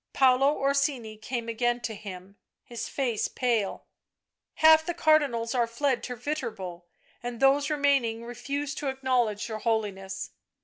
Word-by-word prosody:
Paolo 270 +2 +4
Orsini 275 -5 0
came 230 +2 -4
again 240 +1 0
to 225 - -3
him, 195 -2 -9 0.3
his 235 -2 -6
face 245 -6 -1
pale. 230 -6 -1 0.4
" - - -61
Half 315 0 +7
the 345 - -2
Cardinals 280 -9 +2
are 240 -2 +2
fled 245 +1 0
to 250 - -5
Yiterbo 220 - -5 0.4
and 240 -1 -5
those 275 +1 +4
remaining 275 -6 +1
refuse 275 +4 -4
to 295 -1 -4
acknowledge 250 -6 0
your 220 -2 -5
Holiness." 200 -4 -2
240 Hz, 140 wpm, -28 LUFS, 220-275 Hz, 0.4 s, Half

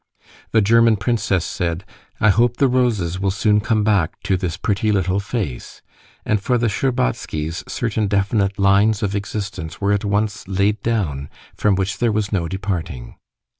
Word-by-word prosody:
The 110 - +4
German 115 +1 +4
princess 100 -4 0
said, 90 +1 -3 0.3
"I 110 - +5
hope 120 +4 +2
the 140 - +4
roses 110 -9 0
will 95 0 0
soon 105 +2 +2
come 110 0 +1
back 100 -6 +1
to 95 - +1
this 90 -1 -3
pretty 105 +2 0
little 95 -1 +1
face," 100 - -5 0.4
and 105 -2 +1
for 125 +4 +1
the 120 - 0
Shtcherbatskys 85 - -2
certain 110 -3 -1
definite 100 0 +1
lines 100 +2 +3
of 100 -1 -1
existence 100 -5 -5
were 100 0 +1
at 100 - 0
once 105 -1 -1
laid 100 +2 +1
down 85 -12 -1 0.2
from 105 -2 +2
which 95 +1 -2
there 120 -2 +2
was 105 -1 -1
no 90 -5 0
departing. 90 -9 -4
100 Hz, 165 wpm, -20 LUFS, 95-110 Hz, 0.4 s, I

